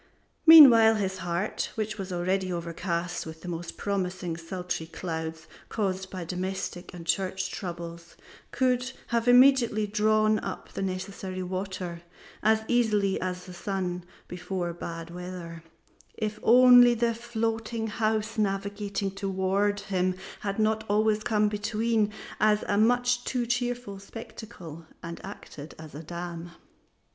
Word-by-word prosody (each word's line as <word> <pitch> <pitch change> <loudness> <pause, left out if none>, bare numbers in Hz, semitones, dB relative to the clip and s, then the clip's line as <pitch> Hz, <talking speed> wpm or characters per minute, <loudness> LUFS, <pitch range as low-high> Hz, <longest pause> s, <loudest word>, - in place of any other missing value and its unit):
Meanwhile 240 -9 +10
his 190 -3 -2
heart, 175 +3 -2
which 215 -1 -3
was 190 -1 -5
already 185 +1 0
overcast 170 0 -3
with 160 0 -9
the - - -7
most 170 -1 -5
promising 185 -3 -2
sultry 170 0 -4
clouds 160 -2 -5 0.2
caused 190 -3 -2
by 185 -2 -5
domestic 180 +1 -4
and 175 -2 -9
church 190 +1 -1
troubles, 170 -2 -7 0.3
could 255 0 0 0.2
have 235 0 0
immediately 245 -4 +5
drawn 215 +1 +2
up 195 - -7
the - - -4
necessary 185 0 -4
water, 185 -2 -4 0.4
as 220 +1 +3
easily 210 -5 +2
as 180 -1 -3
the 180 - -10
sun 180 -1 -3 0.2
before 180 -1 -4
bad 165 0 -7
weather, 175 -2 -7 0.6
if 215 -1 -3
only 245 0 +7
the 230 0 +1
floating 225 -1 -2
house 220 +1 -1
navigating 200 0 -1
toward 195 +1 0
him 185 -2 0 0.2
had 200 -1 -3
not 220 0 +1
always 215 +1 +2
come 210 -2 +2
between 215 +1 0 0.3
as 215 0 +3
a - - +1
much 245 +3 +3
too 245 -1 -1
cheerful 245 -4 -2
spectacle, 195 -6 -10 0.2
and 170 0 -7
acted 160 -6 -9
as 160 -1 -11
a 150 - -7
dam. 170 +1 -6
195 Hz, 130 wpm, -27 LUFS, 180-220 Hz, 0.6 s, Meanwhile